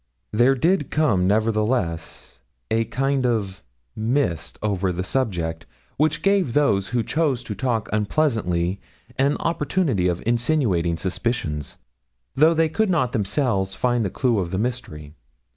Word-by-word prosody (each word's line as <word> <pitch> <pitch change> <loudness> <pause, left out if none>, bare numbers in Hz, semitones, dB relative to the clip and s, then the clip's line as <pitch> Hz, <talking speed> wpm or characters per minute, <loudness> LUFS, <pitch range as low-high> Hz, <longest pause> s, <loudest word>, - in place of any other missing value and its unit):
'There 120 +5 +4
did 165 +2 +1
come, 105 -13 +2
nevertheless, 105 - -1 0.3
a 115 +1 +2
kind 135 +2 0
of 105 -6 -1 0.3
mist 110 - -1
over 100 -3 0
the 90 +1 -3
subject, 85 -10 -2 0.3
which 155 +2 +1
gave 195 -10 +2
those 100 -10 +2
who 120 -1 0
chose 140 -2 0
to 110 - -5
talk 115 0 -1
unpleasantly 100 - 0 0.4
an 140 +2 +2
opportunity 150 - 0
of 90 -1 -2
insinuating 115 - +1
suspicions, 90 - -3 0.6
though 155 +4 +4
they 165 0 +3
could 205 +7 0
not 150 -9 +1
themselves 100 -2 0
find 120 +2 +1
the 100 - -1
clue 120 0 +1
of 90 -3 -2
the 95 - -2
mystery. 105 -11 -4
115 Hz, 135 wpm, -23 LUFS, 95-135 Hz, 0.6 s, There